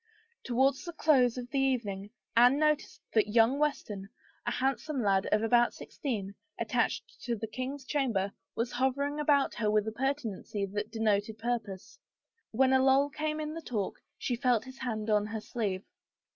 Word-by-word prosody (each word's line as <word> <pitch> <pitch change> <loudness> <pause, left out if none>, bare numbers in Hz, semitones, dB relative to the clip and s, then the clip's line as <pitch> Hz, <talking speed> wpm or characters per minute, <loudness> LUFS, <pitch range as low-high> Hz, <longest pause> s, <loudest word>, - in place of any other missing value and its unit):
Towards 265 +2 +2
the 345 - -6
close 260 -7 +3
of 245 0 -6
the 275 - +1
evening 215 -7 0 0.3
Anne 245 +4 +6
noticed 305 0 +1
that 215 -2 +4
young 230 +5 +4
Weston, 210 -10 -2 0.4
a - - +2
handsome 270 +1 -1
lad 195 -1 +2
of 215 +1 +2
about 240 +1 +4
sixteen, 205 -8 -4 0.3
attached - - -1
to 240 - 0
the 225 0 -4
king's 255 +5 -5
chamber, 235 -10 0 0.2
was 235 +1 -1
hovering 280 +4 0
about 285 -2 +3
her 215 -2 0
with 210 0 +2
a - - -1
pertinacity 230 -5 -2
that 210 +1 -2
denoted 215 -1 0
purpose. 220 -4 -4 0.5
When 260 +3 +3
a 260 - +5
lull 270 +2 +4
came 305 +2 -2
in 305 0 -3
the 330 - -6
talk 215 -10 -2 0.2
she 245 - -1
felt 245 -2 +2
his 260 +1 -11
hand 220 -4 -2
on 210 0 +3
her 220 0 -4
sleeve. 205 -5 -2
245 Hz, 170 wpm, -30 LUFS, 215-270 Hz, 0.5 s, Anne